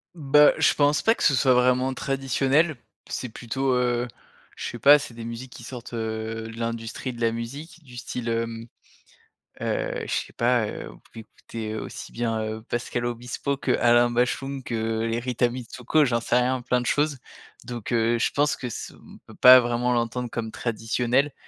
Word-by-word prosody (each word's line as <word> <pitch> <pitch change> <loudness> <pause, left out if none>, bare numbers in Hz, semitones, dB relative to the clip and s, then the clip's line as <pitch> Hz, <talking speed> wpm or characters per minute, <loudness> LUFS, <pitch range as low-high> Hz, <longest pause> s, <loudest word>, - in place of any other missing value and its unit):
Bah, 150 -1 +5
je - - +4
pense 145 0 +2
pas 225 - +3
que - - -4
ce 145 - +5
soit 130 0 +4
vraiment 125 +1 +2
traditionnel. 135 +4 +1 0.3
C'est 125 - -4
plutôt, 130 +4 -2
heu, 125 -1 +1 0.5
je - - -4
sais 120 - -8
pas, 145 +5 +8
c'est 130 -4 -8
des 115 0 -8
musiques 115 +2 -7
qui 120 - -11
sortent, 120 0 -9
heu, 110 0 -4
de - - -12
l'industrie 115 +2 -4
de 120 - -10
la 115 -1 +2
musique, 140 +9 -7
du 125 -1 -13
style, 120 0 -5
hem, 115 0 -2 0.9
heu, - - -2
je - - -3
sais - - -2
pas, 120 -1 +2
heu, - - -7
on - - -14
pouvait 115 - -14
écouter 110 -1 -7
aussi - - -7
bien, 115 -2 -1
heu, 110 0 -4
Pascal 120 +1 -3
Obispo 120 +4 -3
qu'Alain 120 -2 +3
Bashung 130 +3 -1
que, 120 - -6 0.3
heu, - - 0
Les 115 +1 -1
Rita 120 0 0
Mitsouko, 125 +4 0
j'en 120 -2 0
sais 120 - +1
rien, 125 0 0
plein 125 0 +1
de 125 - -5
choses. 145 +2 +1 0.5
Donc 120 -1 -6
heu, 115 0 +2
je 115 - +1
pense 145 +1 +1
que 125 - -5
ce - - -7
on - - -16
peut - - -13
pas 130 0 +9
vraiment 120 0 0
l'entendre 120 +1 -1
comme 115 -1 -4
traditionnel. 120 +4 0
120 Hz, 190 wpm, -25 LUFS, 115-130 Hz, 0.9 s, pas